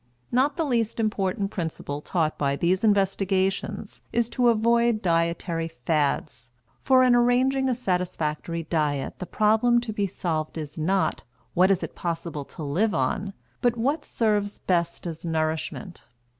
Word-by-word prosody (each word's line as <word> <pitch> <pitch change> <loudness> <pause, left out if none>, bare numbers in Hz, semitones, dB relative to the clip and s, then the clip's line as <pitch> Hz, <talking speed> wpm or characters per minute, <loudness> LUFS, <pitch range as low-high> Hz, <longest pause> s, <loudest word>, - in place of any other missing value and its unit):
Not 270 +4 +2
the 330 - +1
least 230 -5 0
important 200 -2 0
principle 160 -5 -4
taught 160 -1 0
by 140 -1 0
these 180 +6 +1
investigations 195 -2 0
is 235 -1 +1
to 245 -1 +2
avoid 235 0 +3
dietary 165 -1 0
fads, 145 -5 -1 0.3
for 260 -1 +5
in 250 -1 +5
arranging 255 +2 +3
a 250 - +1
satisfactory 170 -6 -2
diet 150 -4 -1
the 180 - -5
problem 220 +3 +3
to 230 -2 -5
be 205 -2 0
solved 160 -4 -3
is 155 -2 -6
not, 185 +5 0 0.3
What 185 +2 +4
is 195 -2 +2
it - - -5
possible 165 -4 -4
to 155 - -9
live 180 +8 +1
on? 185 +9 -1 0.3
but, 240 -1 +2
What 280 +7 0
serves 210 -3 0
best 170 -2 -1
as 165 -2 -5
nourishment? 160 +2 -3
190 Hz, 145 wpm, -25 LUFS, 165-230 Hz, 0.3 s, for